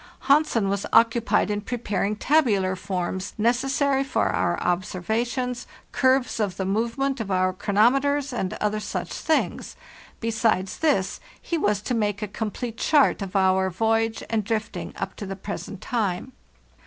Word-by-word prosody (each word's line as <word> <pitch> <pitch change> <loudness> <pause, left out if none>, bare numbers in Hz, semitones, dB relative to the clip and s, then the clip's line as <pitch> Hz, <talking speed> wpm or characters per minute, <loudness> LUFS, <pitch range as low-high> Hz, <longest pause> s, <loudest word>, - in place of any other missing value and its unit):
Hansen 280 -7 +3
was 200 0 -1
occupied 230 -1 +3
in 205 0 -1
preparing 210 -2 -2
tabular 210 -9 +2
forms 185 0 -3
necessary 270 +4 +2
for 275 - 0
our 175 0 0
observations, 225 +8 -2 0.2
curves 260 -2 +2
of 200 -4 -1
the 190 - -2
movement 235 +7 -1
of 220 -3 -4
our 185 -1 +2
chronometers, 265 +8 +2
and 190 -6 -2
other 210 0 -1
such - - -4
things. 320 - -1 0.4
Besides 220 -4 0
this, 280 -13 +1 0.2
he 340 - -3
was 210 -10 +1
to 250 - -2
make 210 -2 0
a - - -2
complete 220 +3 -4
chart 290 -8 +3
of 195 0 -6
our 190 0 +3
voyage 225 +4 0
and 225 -2 0
drifting 220 +1 -3
up - - -4
to 205 - -6
the 195 - -4
present 200 0 -7
time. 215 0 -2
220 Hz, 145 wpm, -24 LUFS, 195-250 Hz, 0.4 s, Hansen